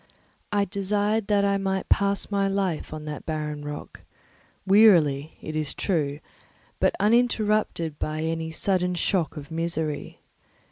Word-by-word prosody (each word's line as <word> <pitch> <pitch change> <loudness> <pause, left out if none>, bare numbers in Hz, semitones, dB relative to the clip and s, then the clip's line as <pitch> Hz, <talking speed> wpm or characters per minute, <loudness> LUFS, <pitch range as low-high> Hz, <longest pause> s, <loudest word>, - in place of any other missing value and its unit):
I 205 -1 +2
desired 205 +2 0
that 205 -1 +3
I 200 0 +2
might 190 0 -1
pass 200 +1 +1
my 200 -1 +2
life 195 -4 -1
on 155 0 -6
that 150 -2 -6
barren 150 -2 -4
rock, 145 0 -7 0.6
wearily, 170 -8 +5
it 155 - -5
is 155 -2 -2
true, 150 -6 -1 0.6
but - - +2
uninterrupted 215 -8 +1
by 155 0 -2
any 160 0 -2
sudden 180 +2 0
shock 175 -2 0
of 145 +2 -8
misery. 160 -2 -3
180 Hz, 135 wpm, -25 LUFS, 155-200 Hz, 0.6 s, wearily